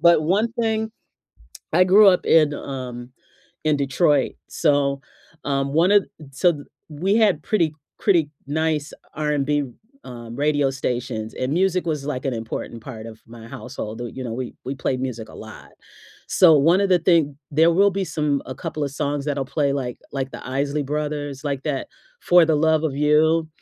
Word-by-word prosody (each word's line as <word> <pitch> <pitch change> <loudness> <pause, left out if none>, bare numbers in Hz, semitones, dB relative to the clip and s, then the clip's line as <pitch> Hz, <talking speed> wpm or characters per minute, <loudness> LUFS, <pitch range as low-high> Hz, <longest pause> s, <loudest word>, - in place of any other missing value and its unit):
But 170 -1 +5
one 205 +8 +1
thing 220 -1 0 0.8
I 180 - +6
grew 200 +3 +7
up 180 - +1
in, 155 -2 +4
um, 125 -3 -7 0.5
in 155 -1 +2
Detroit, 140 +1 +2 0.2
so, 140 -3 +1 0.4
um, 140 -1 -1
one 170 +5 +3
of 205 -2 +4 0.3
so, 175 +7 +3
d 145 -3 -8 0.3
we 180 +7 0
had 200 -9 +3
pretty 170 -8 0 0.3
pretty 170 -7 +2 0.2
nice 155 0 -1 0.2
R&B 150 -1 0
r 135 - -9 0.6
um, 115 - -8
radio 145 -1 +1
stations, 125 -4 -3
and 130 +2 -2
music 185 +1 +1
was, 150 -4 -2
like, 130 -4 -3
an 130 - 0
important 115 +1 -6
part 115 -3 -8
of 110 -1 -11
my 115 0 -12
household, 115 -4 -7
do 120 - -4
you 130 - -6
know, 115 - -4
we 125 0 -5
we 130 - -3
played 130 -1 -2
music 120 -4 -4
a - - -13
lot. - - -11 0.6
So, 170 -4 +6
one 165 +7 +4
of 200 - +2
the 180 - +4
thing 160 -5 +2
there 160 +3 +4
will 200 +4 +4
be 195 0 -2
some 150 -4 -1
a 130 - -6
couple 155 -3 -4
of 140 - -3
songs 145 0 -2
that'll 140 -2 -1
play, 140 +1 0
like 130 -3 -3
like 135 -1 -3
The - - -9
Isley 140 +2 -1
Brothers, 145 -1 -3
like, 140 -2 -2
that 145 -4 -2 0.3
"For 175 -1 +5
the 160 - +2
Love 160 +1 +2
of 145 - -1
You." 155 +2 +3
145 Hz, 185 wpm, -22 LUFS, 135-165 Hz, 0.8 s, grew